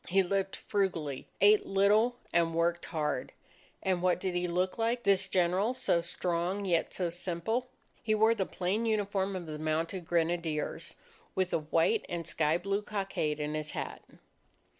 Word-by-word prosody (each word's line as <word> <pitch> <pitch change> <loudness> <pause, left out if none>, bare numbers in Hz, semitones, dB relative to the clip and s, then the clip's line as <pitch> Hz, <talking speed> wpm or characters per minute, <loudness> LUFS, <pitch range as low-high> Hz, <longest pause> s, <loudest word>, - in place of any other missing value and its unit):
He 190 +2 +4
lived 195 +1 -1
frugally, 170 -9 -2
ate 205 +1 +6
little, 210 +5 +4 0.2
and 165 -1 +2
worked 170 +1 +1
hard. 150 -5 -2 0.5
And 185 -2 +1
what 180 -1 +2
did 185 -1 -2
he 175 0 0
look 180 +4 -1
like, 235 +2 0
this 195 -1 +3
General 190 +6 +2
so 170 -8 +2
strong 175 +3 -2
yet 170 -3 +1
so 175 -3 -1
simple? 180 +8 -2 0.3
He 215 -2 +1
wore 220 +1 +5
the 195 -5 -1
plain 200 +6 -1
uniform 200 -3 0
of 180 -2 -4
the 155 -1 -6
Mounted 165 +3 -2
Grenadiers, 165 -2 -1 0.4
with 185 -1 +1
the - - +2
white 160 +2 +2
and 170 -1 -3
sky 155 +1 +1
blue 195 +3 -1
cockade 195 -8 -2
in 150 0 -2
his 155 0 -3
hat. - - -5
180 Hz, 160 wpm, -31 LUFS, 165-200 Hz, 0.5 s, ate